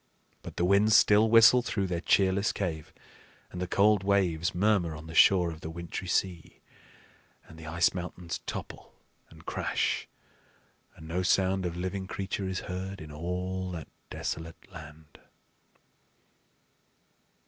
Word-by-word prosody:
But - - -10
the 85 - +1
winds 105 +3 +5
still 105 +2 +5
whistle 115 +2 +7
through 100 -5 -2
their 90 -2 -3
cheerless 95 +2 +2
cave, 80 -6 -4 0.6
and 90 - -6
the 90 - -2
cold 105 +2 +3
waves 90 -5 +1
murmur 95 -4 +1
on 75 +1 -10
the 80 - -9
shore 90 0 +5
of 80 0 -11
the 80 - -6
wintry 85 +2 -6
sea, 85 -2 -2 0.9
and 80 - -14
the 80 -1 -11
ice 85 +1 +2
mountains 90 -1 -6
topple - - -7 0.3
and - - -17
crash, - - -1 0.9
and 80 - -12
no 85 +3 -2
sound 95 0 +1
of 85 0 -6
living 95 +1 -4
creature 95 0 -4
is 95 -1 -3
heard 95 +1 -6
in 80 -1 -10
all 90 +4 -4
that 80 -5 -7 0.2
desolate 80 +1 -6
land. 75 -1 -13
90 Hz, 140 wpm, -28 LUFS, 80-95 Hz, 0.9 s, whistle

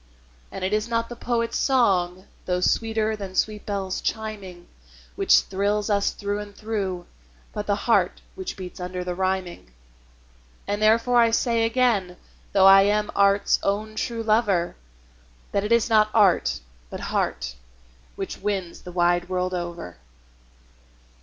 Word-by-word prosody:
And - - -6
it 190 +2 -1
is 215 +1 0
not 230 0 -1
the 240 - -7
poet's 230 -1 -1
song, 185 -8 +1 0.2
though 180 -1 0
sweeter 220 +3 +1
than 195 -3 -8
sweet 210 +1 -1
bells 195 -2 -3
chiming, 200 -5 -5 0.5
Which - - +5
thrills 205 +2 -1
us 200 -1 +2
through 205 0 -3
and 205 -1 -9
through, 195 -5 -3 0.5
but 210 0 -5
the 205 - +2
heart 235 - +2
which 375 -1 -6
beats 185 -1 -8
under 180 0 -4
the 180 0 -3
rhyming. 185 - -3 1.0
And 205 +1 -2
therefore 230 +3 +4
I 230 -1 +5
say 230 0 +1
again, 225 -7 +1 0.3
though 190 -1 +4
I 195 0 +9
am 210 +1 +1
art's 200 0 +3
own 210 +2 -1
true 230 +1 -3
lover, 210 -6 +1 0.8
That 200 - 0
it 210 - -3
is 235 -1 +4
not 215 -2 +4
art, 180 - +3 0.3
but - - -7
heart, - - -1 0.6
which - - -6
wins 190 -4 -3
the 180 - -9
wide 175 0 +1
world 185 0 -1
over. 170 - -5
200 Hz, 145 wpm, -24 LUFS, 185-220 Hz, 1.0 s, I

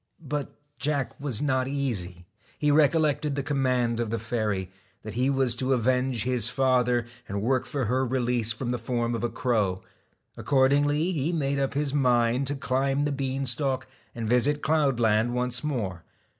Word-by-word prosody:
But 145 0 -3 0.2
Jack 145 -3 -1
was 140 -4 -1
not 130 -3 +1
easy. 100 -11 -3 0.3
He 150 -1 +2
recollected 150 -1 +2
the 140 - -2
command 125 -5 0
of 115 -2 -1
the 115 - -1
fairy, 105 -5 -2 0.3
that 110 - -7
he 125 +4 +1
was 135 -3 +1
to 130 +2 +1
avenge 125 -1 +1
his 125 -2 +1
father, 125 -3 +2 0.2
and 100 +1 -3
work 130 +2 +1
for 140 -5 -2
her 130 +4 +1
release 120 -3 0
from 120 +2 -3
the 125 - -2
form 120 0 -1
of 115 - -3
a 120 - +1
crow. 105 -8 0 0.5
Accordingly 145 +5 +2
he 155 -1 -1
made 140 -4 0
up 135 0 -1
his 145 -1 -1
mind 125 -1 +2
to 145 - 0
climb 135 +1 0
the 145 - 0
bean 135 0 -2
stalk 130 +1 0 0.3
and 115 -2 -3
visit 130 +5 +2
cloudland 120 -7 +2
once 125 0 -1
more. 105 - -3
130 Hz, 170 wpm, -26 LUFS, 120-140 Hz, 0.5 s, He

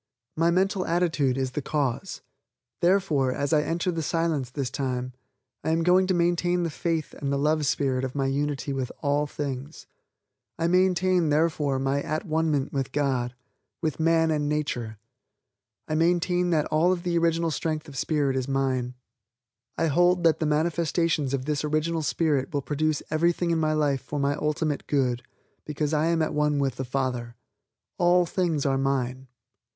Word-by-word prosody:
My 165 +1 +2
mental 190 +2 +1
attitude 160 -7 +1
is 130 -1 -1
the 150 - -3
cause; 145 +3 -2 0.6
therefore, 170 -8 +2
as 140 +4 -1
I 150 - +5
enter 170 +4 -1
the 165 -1 -2
Silence 160 -5 -1
this 130 -1 -3
time, 130 -2 -3 0.5
I - - -1
am 165 +1 +1
going 180 +2 +4
to 185 - +2
maintain 175 +1 +1
the 165 - -2
faith 165 0 -2
and 140 -2 -4
the 140 - +1
love 150 +1 +1
spirit 135 -2 0
of 130 0 -4
my 135 -1 0
unity 140 0 -1
with 130 -2 -3
all 145 +1 +1
things. 140 0 -5 0.7
I 165 - -1
maintain, 180 -1 +3
therefore, 150 -2 +1
my 135 +1 0
at 155 +6 -3
one 160 -1 0
ment 140 -3 -1
with 135 -2 -2
God, 130 -4 -1 0.4
with 155 -3 -2
man 165 0 +3
and 150 -1 0
nature. 125 -7 -2 0.9
I - - -3
maintain 175 +2 +2
that 155 -3 +2
all 160 +4 +3
of 175 -2 -2
the 175 -1 -1
original 165 0 +1
strength 155 0 -2
of 145 - -11
spirit 140 -1 0
is 130 -1 -1
mine. 130 -2 -1 0.8
I - - +1
hold 175 +3 +3
that 165 -2 +4
the 160 - 0
manifestations 160 -1 +1
of 135 -2 -2
this 150 -1 -1
original 155 +2 0
spirit 145 0 0
will 145 -3 -2
produce 155 +1 -1
everything 170 +2 +1
in 165 - +1
my 155 -1 +1
life 145 -3 +1
for 145 - -5
my 140 0 +1
ultimate 150 0 -2
good, 125 -4 +1 0.4
because 150 0 -2
I 155 +1 +2
am 165 -1 +2
at 155 - -2
one 150 0 +1
with 140 -2 0
the 130 - -3
Father. 125 -2 -2 0.6
All 175 0 +4
things 165 -4 -1
are 135 -1 +1
mine. 130 -1 -1
150 Hz, 175 wpm, -26 LUFS, 135-165 Hz, 0.9 s, I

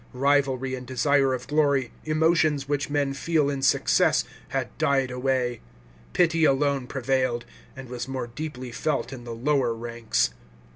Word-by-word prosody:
Rivalry 135 -1 +1
and 125 -1 -6
desire 135 +2 +2
of 125 -1 -3
glory, 140 -4 +2
emotions 155 -2 +2
which 145 -1 -1
men 145 -1 0
feel 150 0 +1
in 140 -1 -3
success, 135 - +3 0.2
had - - -3
died 135 -2 +2
away; 125 -1 -1 0.5
pity 165 -2 +3
alone 140 -2 +2
prevailed, 130 -2 0 0.3
and 135 -1 -9
was 125 +1 -5
more 130 -2 -3
deeply 125 0 -6
felt 145 +2 -2
in 120 -2 -9
the 115 -1 -6
lower 130 -1 +1
ranks." 115 - -1
135 Hz, 145 wpm, -25 LUFS, 125-145 Hz, 0.5 s, success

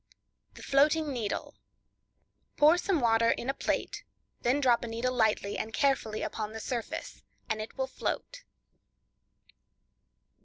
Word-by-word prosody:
The - - -11
Floating 295 +2 +3
Needle.—Pour 295 - -2
some 380 -4 +1
water 230 -1 +4
in 260 - 0
a - - -10
plate; - - -2 0.4
then 255 +4 +2
drop 245 -4 +3
a - - -3
needle 230 +3 -1
lightly 220 -4 +1
and 220 - -4
carefully 225 -5 0
upon 215 -1 -4
the 225 - -5
surface 235 0 -5 0.3
and 220 -1 -2
it 215 - -8
will 265 - 0
float. - - -4
245 Hz, 125 wpm, -30 LUFS, 225-280 Hz, 0.4 s, water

